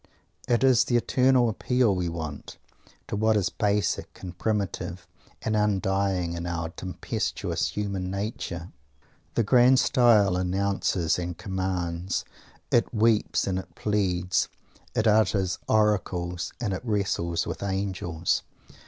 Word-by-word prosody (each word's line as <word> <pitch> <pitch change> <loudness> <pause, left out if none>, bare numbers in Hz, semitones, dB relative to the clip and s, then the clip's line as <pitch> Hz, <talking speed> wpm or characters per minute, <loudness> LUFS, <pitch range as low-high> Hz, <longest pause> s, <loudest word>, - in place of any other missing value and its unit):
It 120 +1 +2
is 130 -3 +5
the 120 - +2
eternal 125 +1 +3
appeal 120 0 +1
we 90 -2 -1
want, 80 -4 -6 0.5
to - - -3
what 110 +1 +3
is 100 -2 +1
basic 105 -3 -1
and 90 -1 -7
primitive 100 -3 -2 0.4
and 110 - 0
undying 95 -3 +1
in 85 0 -4
our 85 -1 -2
tempestuous 90 +2 -3
human 100 -3 -3
nature! 95 -3 -4 0.6
The 115 - +3
grand 125 +3 +5
style 105 -7 +4
announces 95 -2 0
and 90 -1 -4
commands. 95 -2 -2 0.5
It 120 - +3
weeps 110 -1 +2
and 95 -1 -1
it - - -11
pleads. 95 -4 0 0.5
It 110 - +1
utters 105 -4 +2
oracles 90 -5 +1
and 110 -5 -1
it 95 - -4
wrestles 95 -6 -1
with - - -5
angels. 95 -4 -1
95 Hz, 125 wpm, -26 LUFS, 90-110 Hz, 0.6 s, is